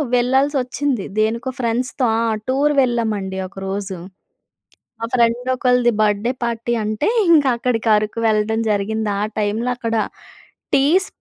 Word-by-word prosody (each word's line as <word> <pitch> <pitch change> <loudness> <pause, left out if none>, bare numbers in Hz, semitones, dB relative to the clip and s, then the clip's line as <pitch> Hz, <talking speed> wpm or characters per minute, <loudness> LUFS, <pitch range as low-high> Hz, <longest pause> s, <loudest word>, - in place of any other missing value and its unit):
వెళ్ళాల్సి 265 +4 +2
వచ్చింది. 255 -3 -2
దేనికో 230 +4 0
ఫ్రెండ్స్‌తో 250 +2 -1
ఆ! - - +1 0.3
టూర్ 290 +3 +2
వెళ్ళామండి 220 -6 -1
ఒకరోజు. 195 0 -5 1.0
మా 230 - -2
ఫ్రెండ్ 235 +1 +2
ఒకళ్ళది 250 -1 +3
బర్త్‌డే 210 +3 +1
పార్టీ 235 0 -2
అంటే 215 - -1 0.2
ఇంకా 290 -5 +5
అక్కడికి 235 -2 -1
అరుకు 215 +2 -3
వెళ్ళడం 220 +1 +1
జరిగింది. 210 +1 -1
ఆ - - +1 0.2
టైంలో 215 +4 -1
అక్కడ 230 -2 -2 0.8
టీస్ 310 +8 +3
230 Hz, 125 wpm, -19 LUFS, 215-255 Hz, 1.0 s, ఇంకా